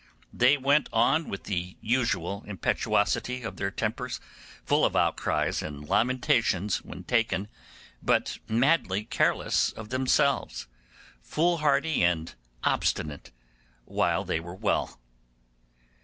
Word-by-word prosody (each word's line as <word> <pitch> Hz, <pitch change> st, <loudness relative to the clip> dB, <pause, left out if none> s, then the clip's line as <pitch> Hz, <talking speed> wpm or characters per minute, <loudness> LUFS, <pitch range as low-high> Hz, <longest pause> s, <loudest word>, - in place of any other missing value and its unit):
They 130 Hz, +4 st, +4 dB
went 140 Hz, +2 st, +2 dB
on 160 Hz, +1 st, +2 dB
with 95 Hz, -, -5 dB
the 90 Hz, -2 st, -4 dB
usual 105 Hz, -5 st, -1 dB
impetuosity 120 Hz, +5 st, 0 dB
of 110 Hz, -, -6 dB
their 100 Hz, -, -1 dB
tempers, -, -, -3 dB, 0.5 s
full -, -, +2 dB
of -, -, +2 dB
outcries -, -, +1 dB
and 75 Hz, -1 st, -7 dB
lamentations 115 Hz, -, +2 dB
when 90 Hz, -, -10 dB
taken, 110 Hz, -2 st, 0 dB, 0.5 s
but -, -, +1 dB
madly 115 Hz, -, +2 dB
careless -, -, +1 dB
of 110 Hz, -1 st, -10 dB
themselves, 130 Hz, -, +1 dB, 0.6 s
foolhardy 160 Hz, -1 st, +1 dB
and 85 Hz, -2 st, +1 dB, 0.3 s
obstinate, 75 Hz, -2 st, -1 dB, 0.6 s
while -, -, 0 dB
they 80 Hz, -, -1 dB
were 85 Hz, +2 st, -8 dB
well. 105 Hz, -, -1 dB
110 Hz, 110 wpm, -27 LUFS, 90-130 Hz, 0.6 s, They